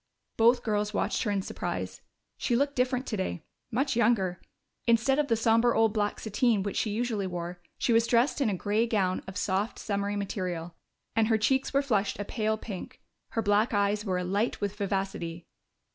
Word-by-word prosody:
Both 235 +2 +4
girls 210 -1 -1
watched - - 0
her 215 - 0
in 200 -2 0
surprise. - - -4 0.4
She 240 - +1
looked 280 +3 +1
different 250 +1 +1
today 190 -6 -3 0.3
much 265 +3 0
younger. 210 -6 +2 0.5
Instead 235 +4 +3
of 295 - +2
the 230 - +3
somber 230 +1 +3
old 225 -1 +3
black 210 -2 0
sateen 220 -1 +1
which 200 - -3
she 220 - +1
usually 215 -2 -1
wore, 175 0 -5 0.2
she 235 - +1
was 230 0 +4
dressed 245 +5 +2
in 255 - +3
a 200 - 0
gray 210 +5 +1
gown 190 -5 +1
of 190 - -6
soft, 200 +3 -1
summery 200 0 -2
material, 180 -4 -3 0.4
and 225 -1 +3
her 225 -1 +3
cheeks 265 +5 +1
were 275 +1 +2
flushed 210 -7 0
a 205 - -4
pale 220 0 -1
pink. 205 -4 -7 0.3
Her 225 - 0
black 205 +2 +2
eyes 205 +1 +1
were 185 -4 -1
alight 195 +6 0
with 205 -1 -2
vivacity. 195 -4 -3
210 Hz, 185 wpm, -29 LUFS, 195-235 Hz, 0.5 s, Both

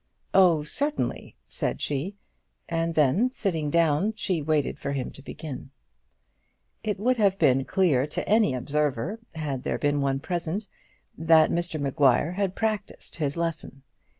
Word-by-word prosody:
"Oh, 175 -5 +5
certainly," 285 - -2
said - - -3
she; 150 +8 -2 0.5
and 165 0 -1
then 155 - +3
sitting 165 - -2
down 170 +6 +2
she 185 -6 -1
waited 150 -1 0
for 140 - -3
him 135 -2 -3
to - - -14
begin. 140 -2 -8 1.1
It 210 -2 -1
would 250 +4 +2
have 200 -3 +3
been 135 -5 +3
clear 155 -9 +2
to 150 - -4
any 215 - +3
observer, 150 - -1 0.2
had 145 -5 -3
there - - -2
been 145 -1 +1
one 135 -1 0
present, 175 +5 -3 0.5
that 160 -1 +5
Mr 170 -2 -2
Maguire 140 +2 +2
had 190 0 -1
practised 215 -2 -3
his 145 -1 -2
lesson. 160 -5 -4
160 Hz, 145 wpm, -26 LUFS, 145-190 Hz, 1.1 s, Oh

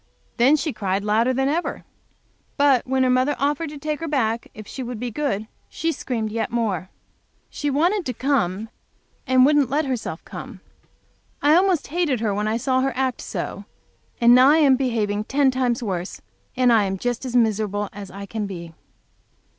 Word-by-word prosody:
Then 260 +5 +5
she 295 -1 -2
cried 195 -1 -2
louder 220 +4 +2
than 265 +1 0
ever. 325 +5 -2 0.7
But 280 -4 +3
when 265 0 +2
her 255 - +2
mother 255 +3 +2
offered 295 +3 -1
to 295 - -8
take 300 +1 -3
her 330 - -4
back 235 -6 -1
if 215 - -9
she 265 - -7
would 245 -2 -5
be 245 0 -4
good, 220 -5 -2 0.2
she 330 - -1
screamed 225 -8 -3
yet 225 +1 -2
more. 205 -6 -1 0.6
She 295 - -2
wanted 350 +8 +1
to 250 - -2
come 220 -6 0 0.6
and 255 0 +5
wouldn't 290 -2 +3
let 295 +3 +1
herself 245 -10 -4
come. - - -9 0.8
I 295 +1 +5
almost 360 -2 +3
hated 310 -6 0
her 215 -2 0
when 210 +1 -1
I 220 +1 0
saw 260 +2 +1
her 270 +1 0
act 260 -1 -1
so, - - -5 0.5
and 235 0 +6
now 255 +2 +7
I 305 - +5
am 285 -4 +5
behaving 215 -5 -1
ten 275 +1 +2
times 250 -2 0
worse 185 -4 -4 0.4
and 250 -2 +4
I 215 -3 +4
am 195 0 -2
just 245 +5 -2
as 250 -2 -4
miserable 210 -3 +1
as 200 -1 -8
I 200 +1 -8
can 210 +1 -4
be. 170 -4 -8
250 Hz, 185 wpm, -22 LUFS, 215-280 Hz, 0.8 s, now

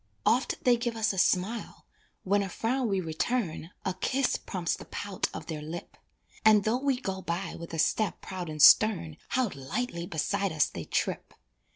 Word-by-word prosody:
Oft 250 +3 +2
they 245 -1 +5
give 235 0 -2
us 220 -1 +1
a 190 - -2
smile, 190 +7 0 0.4
when 200 +2 +2
a 195 - -3
frown 245 +6 -1
we 195 -3 +1
return 165 0 -2 0.2
A 190 - 0
kiss 265 +7 0
prompts 180 -3 -2
the - - -11
pout 200 -2 -3
of - - -7
their 155 -3 -5
lip, 160 +3 -7 0.5
And 215 -2 +6
though 225 +4 +1
we 275 -2 +1
go 190 -6 -4
by 175 +1 -3
with 170 0 -8
a 165 - -4
step 210 +6 +1
proud 180 -3 -6
and 155 -1 +1
stern, 180 -8 +6
How 250 -5 0
lightly 170 - -4
beside 195 +5 -1
us 155 -2 +3
they 85 - -7
trip! - - -2
195 Hz, 185 wpm, -29 LUFS, 170-230 Hz, 0.5 s, And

